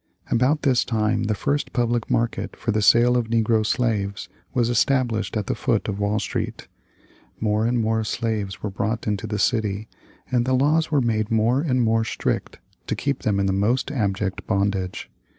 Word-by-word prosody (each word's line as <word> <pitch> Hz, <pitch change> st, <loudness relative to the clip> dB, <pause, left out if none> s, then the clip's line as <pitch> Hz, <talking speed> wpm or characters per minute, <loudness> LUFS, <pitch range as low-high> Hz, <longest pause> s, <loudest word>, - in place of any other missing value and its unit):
About 135 Hz, +6 st, +2 dB
this 130 Hz, -4 st, +3 dB
time 110 Hz, -2 st, 0 dB
the 110 Hz, 0 st, 0 dB
first 145 Hz, +7 st, -1 dB
public 120 Hz, -2 st, 0 dB
market 120 Hz, 0 st, -1 dB
for 115 Hz, -, -2 dB
the 105 Hz, 0 st, +1 dB
sale 120 Hz, +4 st, +5 dB
of 120 Hz, -2 st, +1 dB
negro 115 Hz, -1 st, +2 dB
slaves 105 Hz, -5 st, -1 dB, 0.2 s
was 120 Hz, -3 st, +1 dB
established 120 Hz, -2 st, +1 dB
at 105 Hz, -, -2 dB
the -, -, -1 dB
foot 115 Hz, -4 st, 0 dB
of 100 Hz, -2 st, -3 dB
Wall 100 Hz, +1 st, 0 dB
Street. -, -, -4 dB, 0.7 s
More 110 Hz, +1 st, +1 dB
and 120 Hz, 0 st, +1 dB
more 110 Hz, 0 st, +1 dB
slaves 105 Hz, -3 st, -3 dB
were 105 Hz, -, -2 dB
brought 110 Hz, +3 st, -2 dB
into 105 Hz, +1 st, -2 dB
the 105 Hz, -1 st, -2 dB
city, 105 Hz, -1 st, 0 dB, 0.4 s
and 120 Hz, -2 st, +2 dB
the 130 Hz, +1 st, +1 dB
laws 155 Hz, +5 st, +2 dB
were 145 Hz, -3 st, +2 dB
made 110 Hz, -3 st, 0 dB
more 115 Hz, +4 st, +2 dB
and 130 Hz, -6 st, +1 dB
more 115 Hz, 0 st, +2 dB
strict -, -, -2 dB, 0.3 s
to -, -, -1 dB
keep 140 Hz, -2 st, -2 dB
them 100 Hz, -2 st, +1 dB
in 100 Hz, -, +1 dB
the 95 Hz, -, +1 dB
most 115 Hz, +8 st, +1 dB
abject 100 Hz, -6 st, -2 dB
bondage. 95 Hz, -1 st, -1 dB
110 Hz, 185 wpm, -23 LUFS, 105-120 Hz, 0.7 s, sale